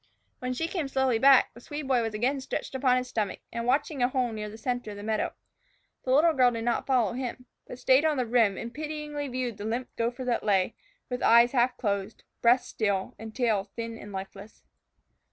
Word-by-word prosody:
When 250 0 -2
she 325 +6 -1
came 335 -5 -2
slowly 265 -3 +1
back, 270 +1 +6
the - - -13
Swede 290 +1 -6
boy 255 -3 +3
was 225 -2 -3
again 260 +5 0
stretched 260 - -4
upon 260 -1 +3
his 250 0 -2
stomach, 210 -5 -2
and 235 0 -3
watching 275 +2 +1
a 245 - +5
hole 255 -2 0
nearer 210 -1 -5
the 215 - -10
center 245 -1 -3
of 205 - -7
the 205 - -8
meadow. 215 0 -1 0.7
The 255 - 0
little 315 +5 +5
girl 255 -3 +5
did 230 -2 -4
not 240 0 0
follow 245 -5 +2
him, 250 0 -5 0.2
but 250 - -8
stayed 260 +2 +4
on 310 -2 +2
the 250 - +1
rim 225 -4 +3
and 235 +1 -6
pityingly 300 -1 -4
viewed 250 -4 -3
the 205 - -6
limp 235 +3 -2
gopher 240 +2 -2
that 245 -1 0
lay, 195 0 +2 0.3
with 250 0 -4
eyes 235 +1 +6
half 250 -1 +2
closed, 200 -1 -2 0.2
breast 240 +2 +4
still, 200 -3 -1
and 220 -1 -9
tail 215 -6 +1
thin 230 -1 -5
and 205 - -10
lifeless. 195 +2 -9
245 Hz, 215 wpm, -28 LUFS, 220-265 Hz, 0.7 s, back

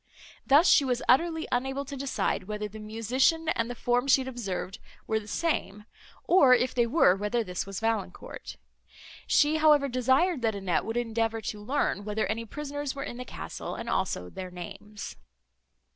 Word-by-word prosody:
Thus 295 +6 +6
she - - +6
was 250 -2 -1
utterly 320 +5 +3
unable 265 +3 -1
to 280 - -7
decide, 265 -7 -1
whether 210 +1 -4
the 215 +1 -11
musician 250 +9 +1
and 230 -5 0
the 245 - -5
form 245 +2 0
she 270 0 +5
had 260 - -6
observed, 205 -6 -4 0.3
were 220 0 0
the 210 - -12
same, 210 -8 -2 0.4
or, 275 -8 +6
if 250 +1 0
they 240 -1 +2
were, 230 - +4
whether 210 +4 -1
this 180 -1 -4
was 195 -2 -5
Valancourt. 225 -5 -4 0.7
She, 300 +1 +4
however, 300 -3 +5
desired 260 +6 +2
that 225 -2 0
Annette 185 -5 -1
would 225 +2 -3
endeavour 225 -1 -1
to 210 0 -5
learn 255 -4 0
whether 210 +1 -1
any 230 +2 -3
prisoners 290 +2 -5
were 275 - -4
in 240 - -6
the 250 - -6
castle, - - -6
and - - -6
also 90 - -1
their 185 -1 -6
names. 195 +4 -8
240 Hz, 175 wpm, -28 LUFS, 210-275 Hz, 0.7 s, Thus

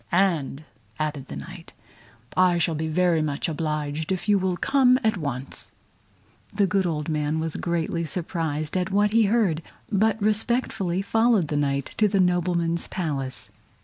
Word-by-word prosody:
"And," 165 -6 +1 0.3
added 150 -3 -3
the 70 - -7
Knight, 70 0 -9 0.6
"I 180 -1 +4
shall 170 -1 +1
be 160 +1 -2
very 170 0 +2
much 145 -2 -1
obliged 155 0 -2
if 190 +2 -2
you 205 -1 +4
will 185 -1 0
come 255 +1 +4
at 220 -1 +2
once." 140 -6 -5 0.8
The 200 0 +2
good 190 0 +1
old 150 -3 -2
man 155 0 0
was 160 -1 -2
greatly 170 -1 -1
surprised 160 -2 -3
at 180 0 0
what 205 +2 +2
he 225 -1 +5
heard, 200 -7 +2 0.3
but 220 +2 +2
respectfully 210 -3 +1
followed 225 -6 +2
the 150 - -1
Knight 140 -1 -1
to 215 - +4
the 200 -1 +1
nobleman's 175 -2 +1
Palace. 135 -8 -3
170 Hz, 155 wpm, -25 LUFS, 155-195 Hz, 0.8 s, he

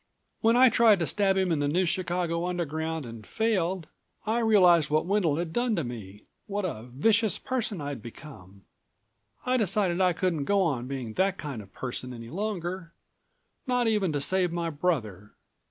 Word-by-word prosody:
When 225 +1 +3
I 255 +1 +7
tried 230 -3 +5
to 170 - -1
stab 195 +2 +1
him 190 -2 +1
in 160 - +1
the 145 - +1
New 180 +6 +1
Chicago 175 -1 -1
Underground 160 -3 -3
and 115 -2 -9
failed... 190 - -1 0.4
I 220 +2 +1
realized 180 -8 +5
what 155 +1 +1
Wendel 185 -6 +1
had 165 0 -3
done 240 -2 +1
to 170 - -1
me, 105 -5 -8 0.2
what 205 -1 -2
a 120 -9 -5
vicious 220 - +2
person 235 -7 -3
I'd 145 -4 -5
become. 100 -6 -12 0.8
I 255 0 +2
decided 190 -4 +1
I 180 -1 +4
couldn't 170 -5 -1
go 200 +4 +2
on 130 -8 -1
being 130 -5 -5
that 195 - +1
kind 140 -7 -5
of 100 -2 -15
person 125 +1 -5
any 115 0 -9
longer, 185 -3 -4 0.7
not 250 -2 +1
even 210 -6 +1
to 145 - -1
save 185 +3 +1
my 170 -1 -2
brother. 110 - -2
175 Hz, 175 wpm, -27 LUFS, 140-200 Hz, 0.8 s, I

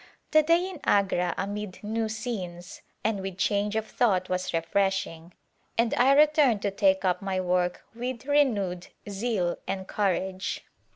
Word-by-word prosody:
The 310 - +6
day 335 +4 +3
in 370 -5 -8
Agra 185 -3 +2
amid 205 0 -5
new 220 +1 -1
scenes 195 -6 -5 0.2
and 215 -2 0
with 190 -1 -5
change 205 +1 0
of 220 0 0
thought 190 -6 +1
was 185 0 -1
refreshing 170 0 -1 0.5
and 230 0 +2
I 260 +3 +5
returned 295 -7 +4
to 200 - 0
take 195 -1 +2
up 180 +1 +1
my 190 -1 -1
work 180 -1 0
with 245 +2 -5
renewed 215 -12 +1 0.2
zeal 200 -3 -1
and 190 -1 -3
courage. 190 -2 -1
200 Hz, 150 wpm, -27 LUFS, 185-230 Hz, 0.5 s, The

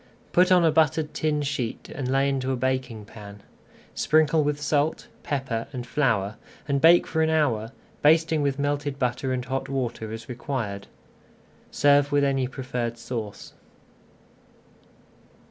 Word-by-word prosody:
Put 180 +1 +4
on 180 -2 +6
a 160 - +4
buttered 155 0 +1
tin 150 -1 0
sheet 135 -5 -4
and 135 -2 -4
lay 135 +1 +2
into 135 -1 -1
a - - 0
baking 130 -4 -2
pan. 100 -1 -12 0.5
Sprinkle 155 0 +3
with 145 0 -1
salt, 150 +1 0
pepper, 130 -5 -3
and 125 -3 -6
flour 110 -7 0 0.3
and 140 -1 0
bake 170 +2 +6
for 160 - -1
an 160 - +2
hour, 125 -9 +1 0.3
basting 160 0 +4
with 140 -1 0
melted 145 -1 -2
butter 130 0 -1
and 125 -1 -2
hot 135 +1 -3
water 120 -5 -3
as 110 0 -7
required. 120 -6 -4 0.8
Serve 145 0 +3
with 145 0 +3
any 135 -2 +1
preferred 125 -3 -4
sauce. 115 -3 -6
135 Hz, 145 wpm, -25 LUFS, 120-150 Hz, 0.8 s, on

